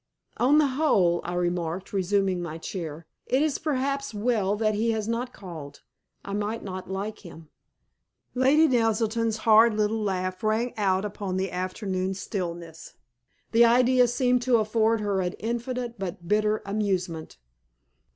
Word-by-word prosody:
"On 270 +5 +4
the 305 - +5
whole," 255 - +2
I 175 - -4
remarked, 175 +1 -2
resuming 195 -1 +1
my 165 -2 -5
chair, 165 -2 -6 0.2
"it 260 +4 +2
is 310 -3 0
perhaps 275 -3 -2
well 205 -2 +1
that 215 0 +1
he 220 +3 0
has 215 -1 -2
not 240 +2 -2
called. 160 -9 -10 0.4
I 200 - -5
might 210 +2 -2
not 185 -1 -6
like 200 +3 -4
him." 165 -4 -13 0.8
Lady 275 +5 +4
Naselton's 225 -2 +1
hard 220 0 +6
little 215 +1 0
laugh 185 -2 -2
rang 220 +3 0
out 195 -2 +1
upon 200 -2 -4
the 190 -1 -2
afternoon 185 +1 -2
stillness. 170 -5 -6 0.6
The 235 +1 +6
idea 250 +1 +4
seemed 250 +1 +1
to 245 -1 +3
afford 220 +1 +1
her 200 -2 0
infinite 235 +5 -3
but 175 -2 -6
bitter 210 +2 +1
amusement. 185 - -2
210 Hz, 140 wpm, -26 LUFS, 185-235 Hz, 0.8 s, hard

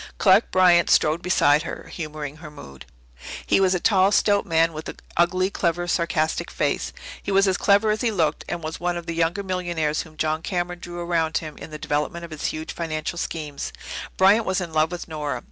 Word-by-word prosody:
Clark 200 +2 +4
Bryant 180 -2 +5
strode 155 +2 +3
beside 150 -5 +3
her, - - -6
humouring 155 -3 -6
her 155 -1 -10
mood. 70 - -12 0.6
He - - +3
was 190 -1 +3
a - - 0
tall, 195 0 +4
stout 205 -1 +3
man, 165 -1 +2
with 155 0 -6
an - - -8 0.2
ugly, 185 +3 +2
clever, 175 -2 -1
sarcastic 170 -2 0
face. - - -1 0.3
He - - -4
was 195 +1 +4
as 190 - +2
clever 205 +2 +3
as 215 - -1
he 240 - +2
looked, 160 -8 0
and 175 -1 -4
was 155 +1 -5
one 175 0 -1
of 170 - -6
the 165 - -3
younger 170 +4 0
millionaires 175 -5 -1
whom 155 -1 -13
John 155 0 0
Cameron 175 0 -3
drew 175 0 -7
around 165 -2 0
him 155 -2 -6
in - - -10
the 155 - -7
development 150 +4 -2
of 165 - -13
his 155 - -6
huge 155 0 -5
financial 165 0 -3
schemes. 150 -5 -4 0.5
Bryant 200 +4 +5
was 190 0 +1
in 170 -3 -5
love 155 +2 +2
with 175 -1 -6
Nora. 150 -5 -3
170 Hz, 210 wpm, -23 LUFS, 155-185 Hz, 0.6 s, Bryant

